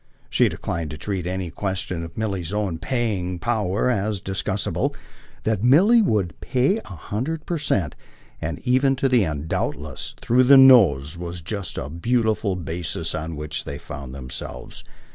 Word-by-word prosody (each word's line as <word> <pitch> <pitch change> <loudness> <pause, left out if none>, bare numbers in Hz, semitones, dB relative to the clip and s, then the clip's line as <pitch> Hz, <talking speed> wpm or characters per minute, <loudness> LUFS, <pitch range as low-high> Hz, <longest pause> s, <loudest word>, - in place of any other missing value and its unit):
She - - +4
declined 85 -2 -4
to 75 - -6
treat 95 +1 -3
any 90 -2 -3
question 95 -2 -3
of 80 - -9
Milly's 100 -6 -2
own 100 -6 -1
"paying" 100 -6 -1
power 105 +1 0
as 105 -2 -1
discussable; 95 0 -1 0.5
that 110 -2 0
Milly 190 - +6
would 105 - 0
pay 135 - +1
a - - -14
hundred 125 - -4
per 170 -2 -2
cent 95 - 0 0.5
and 80 -2 -3
even 135 +2 +3
to 135 +1 +1
the 125 -4 +4
end, 75 -3 -3
doubtless, 75 -3 -3
through 125 +2 +3
the 135 +2 +8
nose 90 - +6
was 85 0 -5
just 100 +2 -3
the - - -4
beautiful 110 +4 0
basis 85 -1 -2
on 80 +1 -4
which 75 0 -3
they 70 - -6
found 70 -2 -8
themselves. 65 -2 -6
95 Hz, 160 wpm, -23 LUFS, 80-120 Hz, 0.5 s, the